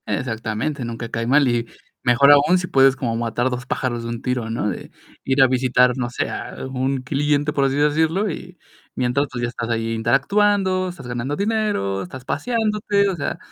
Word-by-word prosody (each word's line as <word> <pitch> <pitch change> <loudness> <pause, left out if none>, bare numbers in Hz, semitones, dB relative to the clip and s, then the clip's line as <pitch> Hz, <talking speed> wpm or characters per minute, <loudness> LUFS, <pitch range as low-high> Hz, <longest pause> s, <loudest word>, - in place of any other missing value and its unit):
Exactamente, 120 +4 -3
nunca 115 0 -5
cae 115 0 -3
mal 140 +2 +4
y 120 -1 0 0.4
mejor 125 +3 +5
aún 145 +5 +5
si 180 - -2
puedes 135 -2 +4
como 120 -3 -2
matar 120 +2 -1
2 125 0 -5
pájaros 120 -3 -2
de 115 - -5
un 115 0 -5
tiro, 125 -3 -2
¿no?, 115 -2 -2
de 90 - -7 0.3
ir 135 +1 +2
a - - +6
visitar, 125 -1 +3
no 125 -2 -2
sé, 125 - -2
a - - -6 0.2
un 130 0 -1
cliente, 145 +2 0
por 140 -2 +2
así 135 0 0
decirlo, 160 +7 +2
y 180 +3 -9 0.4
mientras 130 +3 0
tú 125 - -7
ya 120 - -1
estás 120 -1 -5
ahí 115 0 -1
interactuando, 185 - +2
estás 160 -8 -10
ganando 120 +4 -3
dinero, 205 - -1
estás 125 +8 -9
paseándote, 210 - 0
o 190 - -2
sea, 150 - -3
130 Hz, 190 wpm, -21 LUFS, 120-155 Hz, 0.4 s, a